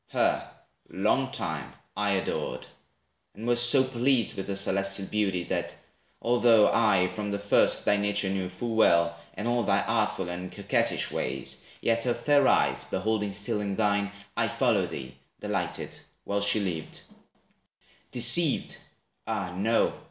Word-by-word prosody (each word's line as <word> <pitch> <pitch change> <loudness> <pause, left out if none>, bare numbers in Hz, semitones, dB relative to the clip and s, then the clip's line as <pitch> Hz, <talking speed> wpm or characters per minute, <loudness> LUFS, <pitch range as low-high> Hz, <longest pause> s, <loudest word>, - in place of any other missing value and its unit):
Her, - - 0 0.4
long - - 0
time, - - -4 0.2
I - - 0
adored; 65 - -3 0.7
and 110 - -8
was 120 0 +3
so 125 +2 +6
pleased 130 -2 0
With 95 - -5
her 100 - -3
celestial 100 0 +1
beauty, 95 -4 -1
that, - - -3 0.4
although 120 -2 +4
I 95 -5 +3
from 105 +2 -5
the 100 - -2
first 100 0 +3
thy 105 - +3
nature 105 -1 0
knew 95 -1 -2
full 115 +6 -5
well, 85 -6 +3 0.2
And 105 - -4
all 120 0 +1
thy 100 -2 +1
artful 105 -5 -1
and 90 +1 -6
coquettish - - 0
ways, 65 -1 -4 0.2
Yet 115 0 +1
her 120 - +1
fair 145 -2 +3
eyes - - +2
beholding 110 -2 -2
still 100 +1 -1
in 100 -1 -3
thine, 100 -1 0 0.2
I - - +1
followed - - +1
thee, 65 -1 -7 0.3
delighted, - - -3 0.3
while 100 0 -2
she 100 +1 +3
lived; 85 -6 -4 1.1
Deceived? 125 +6 +3 0.5
Ah, 90 -2 -3
no! 110 +5 +1
105 Hz, 145 wpm, -27 LUFS, 95-115 Hz, 1.1 s, so